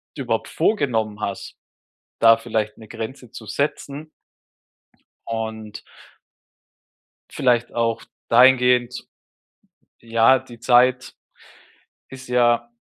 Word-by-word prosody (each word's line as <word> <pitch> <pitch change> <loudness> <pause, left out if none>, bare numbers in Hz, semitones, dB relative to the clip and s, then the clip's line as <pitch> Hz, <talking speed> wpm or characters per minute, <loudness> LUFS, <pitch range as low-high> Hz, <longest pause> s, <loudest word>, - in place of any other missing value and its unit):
überhaupt - - -3
vorgenommen 115 - -1
hast, 100 -2 -6 0.7
da 115 0 +7
vielleicht 110 -2 -3
'ne 110 - -13
Grenze 115 +2 -8
zu 110 - -10
setzen 140 +5 -4 1.2
und 110 -2 -6 1.5
vielleicht 120 -2 0
auch 115 -1 -1 0.3
dahingehend 125 0 +3 0.9
ja, 115 +3 +3
die 120 -2 -15
Zeit 125 +1 +2 0.9
ist 130 -1 -11
ja 120 -1 +2
120 Hz, 85 wpm, -21 LUFS, 115-125 Hz, 1.5 s, da